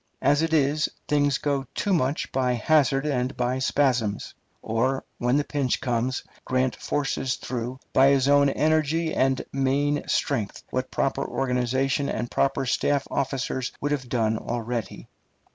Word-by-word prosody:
As 145 +2 +4
it 165 0 0
is, 150 0 +2 0.2
things 145 -2 +2
go 140 -2 -1
too 205 - 0
much 140 -4 0
by 130 -1 +1
hazard 135 +2 +2
and 130 -3 -1
by 125 +1 0
spasms; 125 -6 0 0.3
or, 130 +4 0 0.2
when 125 +3 +2
the 145 - +2
pinch 140 -4 -1
comes, 125 0 -1 0.2
Grant 130 0 0
forces 135 -2 -1
through, 125 +1 -5
by 135 +1 +6
his 135 -1 +3
own 140 0 +5
energy 155 +2 +1
and 130 0 +1
main 140 +2 +1
strength, 115 -8 -1
what 130 +1 -2
proper 135 0 0
organization 135 +2 0
and 120 +2 -3
proper 135 -1 +1
staff 140 +3 +1
officers 130 -1 -2
would 145 - -2
have 135 -4 -2
done 110 -3 +1
already. 115 -3 -4
135 Hz, 145 wpm, -25 LUFS, 125-145 Hz, 0.3 s, by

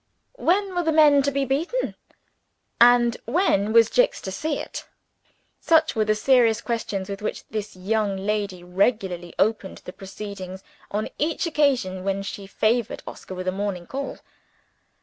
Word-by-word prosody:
When 385 +2 +1
were 355 - +1
the 325 -2 +1
men 300 -2 +6
to 280 - +1
be 275 0 -1
beaten? 330 - -1 0.9
and 240 0 +6
when 230 - +2
was 230 0 +5
Jicks - - +3
to 190 - -5
see 295 +9 -2
it? - - -7 0.7
Such 320 -1 +3
were 215 -1 +2
the 215 0 +2
serious 235 -1 +4
questions 215 -5 -3
with 200 0 -6
which 210 - -4
this 215 -2 -5
young 200 +1 -1
lady 200 -2 -2
regularly 180 -2 -1
opened 205 -2 0
the 180 - -8
proceedings, 195 -1 -8 0.3
on 210 +1 -2
each 320 +4 0
occasion 260 - +1
when 195 0 -1
she 195 0 -7
favored 220 +3 0
Oscar 185 - -9
with 185 0 -5
a - - +2
morning 195 -2 -3
call. 275 +7 -5
215 Hz, 155 wpm, -24 LUFS, 195-275 Hz, 0.9 s, men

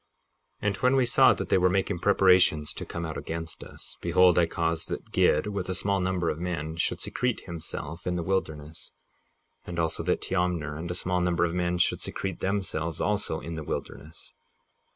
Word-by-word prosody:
58:16 - - +1
And 100 - 0
when 125 +2 +3
we 130 -2 +4
saw 120 - +6
that - - -5
they - - +4
were 90 0 +4
making 95 -2 0
preparations 90 -6 +4
to - - -7
come 85 0 -4
out 80 - -4
against 80 -1 -6
us, - - -9
behold, 90 0 +5
I 85 - +4
caused 80 0 -1
that - - -6
Gid, 75 - +3
with 100 -3 -3
a 95 - -1
small 100 +2 +1
number 90 -2 0
of 75 - -6
men, 80 -3 -3
should - - 0
secrete 125 -2 -1
himself 85 -1 -6
in 90 - 0
the 85 - -1
wilderness, 80 -5 -3 0.7
and 85 - -7
also 80 -1 0
that - - 0
Teomner 90 -5 -1
and 85 +3 -5
a 90 - -2
small 90 0 0
number 90 -1 +2
of 85 - -2
men 90 0 0
should 90 - +2
secrete 95 -3 -4
themselves 90 -5 -2
also 100 -6 0
in 85 - -6
the 80 -1 -5
wilderness. 75 +1 -6
90 Hz, 195 wpm, -27 LUFS, 80-95 Hz, 0.7 s, saw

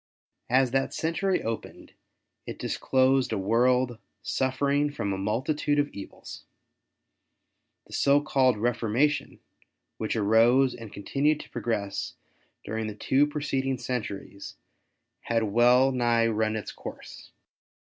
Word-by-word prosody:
As 130 0 +3
that 135 +1 0
century 180 +4 0
opened 115 0 -6 0.5
it - - -6
disclosed 130 -1 +1
a 110 - 0
world 120 +4 +2 0.2
suffering 140 +4 0
from 100 -8 -3
a - - -3
multitude 135 +9 0
of 145 0 +2
evils. 100 - -10 1.4
The - - -15
so 140 +1 +4
called 135 -4 +2
Refor 115 +1 -1
mation, 145 +4 +1 0.6
which 110 - -2
arose 115 +5 +4
and 115 -3 -10
continued 145 +8 0
to - - -15
progress 100 -4 -3 0.5
during 110 +1 -3
the 105 - -6
two 135 +6 +2
preceding 135 -3 -2
centuries 105 -5 -5 0.6
had 115 -1 0
well 120 +5 +4
nigh 120 -2 +2
run 110 -1 0
its 110 - -5
course. - - -10
125 Hz, 120 wpm, -27 LUFS, 110-135 Hz, 1.4 s, so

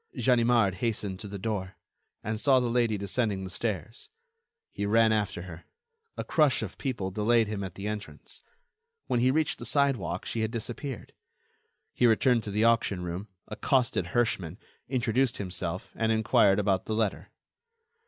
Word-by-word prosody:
Ganimard 120 -5 +3
hastened 105 -5 -2
to 105 - -6
the 100 0 -6
door, 95 -2 -3 0.5
and 110 +1 -3
saw 135 +1 +4
the 120 -2 -1
lady 115 -3 +2
descending 100 0 -1
the 95 - -6
stairs. 110 +1 -4 0.6
He 100 - -3
ran 110 +1 +4
after 105 -5 -1
her. 85 -2 -10 0.5
A - - -2
crush 150 -5 +2
of - - -7
people 120 -9 -3
delayed 110 +3 +2
him 105 -1 -3
at 95 - -6
the 100 - -7
entrance. 105 -1 -7 0.6
When 120 - 0
he 125 +2 +3
reached 155 +3 +1
the - - -7
sidewalk, 120 -12 0
she 115 - -3
had 110 - 0
disappeared. 120 +3 -6 0.8
He 125 - +3
returned 120 +1 +3
to - - -4
the 105 +2 +1
auction 115 -6 +2
room, 90 +4 -5 0.2
accosted 130 -1 0
Herschmann, 100 -8 0 0.3
introduced 125 0 +1
himself, 90 -2 -4
and 110 0 0
enquired 110 -3 +4
about 100 -2 +1
the 110 - -2
letter. 110 -2 -1
110 Hz, 160 wpm, -28 LUFS, 100-120 Hz, 0.8 s, saw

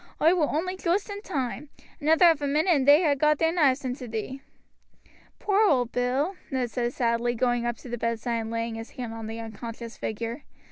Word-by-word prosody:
Oi 325 +3 +5
war 330 -5 +1
only 365 +5 -1
joost 375 +3 -1
in 405 0 -6
toime, 280 - -4 0.3
another 320 +4 +4
quarter 340 - +8
of 310 -3 -3
a 285 - 0
minute 310 +6 +3
and 270 -2 0
they'd 295 +5 +7
ha' 285 - +3
got 300 +2 +3
their 325 +1 +2
knives 280 -5 +2
into 250 0 -4
thee." 230 +4 -5 1.0
"Poor 405 0 +1
old 250 -4 +2
Bill," 260 +9 0
Ned 255 -5 -2
said 240 0 -1
sadly, 235 0 0
going 240 0 +1
up 240 -1 -2
to - - -12
the 240 -1 -5
bedside 230 +1 -1
and 225 -1 -4
laying 230 0 -2
his 225 +1 -7
hand 240 -3 -5
on 225 -1 -6
the 225 +1 -6
unconscious 230 +1 -8
figure. 230 +5 -4
255 Hz, 215 wpm, -26 LUFS, 230-305 Hz, 1.0 s, quarter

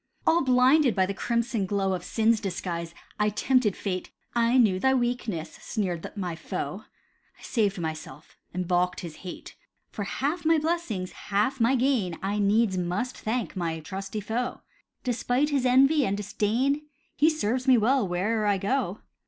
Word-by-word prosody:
All 340 +1 +4
blinded 260 +1 +4
by 190 -2 +3
the 200 - -3
crimson 235 -1 -1
glow 195 -1 0
Of 180 -1 -3
sin's 225 +3 +2
disguise, 175 -4 -4 0.2
I 210 0 +3
tempted 220 -1 +2
Fate. 185 -3 -3 0.2
"I 235 +1 +3
knew 205 -7 +4
thy 265 +5 +3
weakness!" 240 -9 -2
sneered 180 -7 -3
my 180 -4 -3
foe, - - -5 0.5
I - - -18
saved 210 -5 0
myself, 155 -3 -6 0.2
and 180 0 -3
balked 180 0 +1
his 165 -3 -8
hate. 180 -2 -9 0.4
For 205 - -4
half 290 - -2
my 325 0 +4
blessings, 310 - -2
half 210 +7 -1
my 235 +3 +4
gain, 240 -10 +1
I 200 +2 -1
needs 205 -1 +2
must 180 +9 -2
thank 225 0 -3
my 165 -3 -2
trusty 195 +5 -5
foe; 235 +5 -3 0.4
Despite 250 +3 +1
his 270 -3 +2
envy 275 +4 +5
and 200 -4 0
disdain, 235 +8 0 0.3
He 305 +3 +5
serves 255 -4 -1
me 255 -2 +7
well 235 0 +2
where'er 210 +5 0
I 200 -1 +3
go. 205 -1 -1
215 Hz, 160 wpm, -27 LUFS, 185-255 Hz, 0.5 s, me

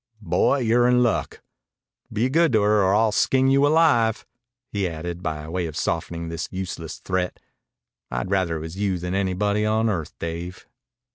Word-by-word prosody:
"Boy, 95 +10 +2
you're 120 +1 +3
in 125 0 +4
luck. 120 - -1 0.7
Be 110 +4 +1
good 160 +2 +2
to 110 -2 +4
her, 105 0 +3
or 95 +1 +3
I'll 110 0 +3
skin 130 +4 +2
you 140 +1 +4
alive." 145 -8 +3 0.5
He 100 -3 -1
added, 85 +2 -6
by 75 -3 -4
way 85 +1 -2
of 80 - -7
softening 85 0 -2
this 80 -1 -4
useless 90 -4 -5
threat, 90 -1 -2 0.7
"I'd 60 +9 -3
rather 95 -4 +1
it - - -6
was 80 +3 -7
you 100 -2 0
than 90 +1 -4
anybody 100 +2 0
on 110 +1 +1
earth, 85 -6 -4
Dave." 85 +2 -6
95 Hz, 170 wpm, -23 LUFS, 85-110 Hz, 0.7 s, in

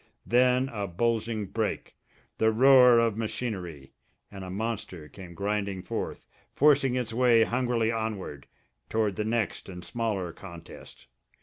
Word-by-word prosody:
Then 125 +2 +3
a 105 -5 -4
bulging 110 +3 -1
break 110 +2 -3 0.5
the 110 0 +4
roar 125 +1 +7
of 115 -2 +2
machinery, 95 - -5 0.4
and 100 -2 -8
a 95 - -7
monster 95 -5 -4
came 90 -1 -12
grinding 100 -1 -2
forth, - - -5 0.3
forcing 140 -3 +4
its 120 -3 -2
way 120 -1 +4
hungrily 120 -2 0
onward, 110 -10 -4 0.4
toward 110 -3 0
the 105 - -2
next 110 -3 -2
and 90 -2 -8
smaller 105 -7 -2
contest. 85 -4 -12
110 Hz, 130 wpm, -27 LUFS, 95-120 Hz, 0.5 s, roar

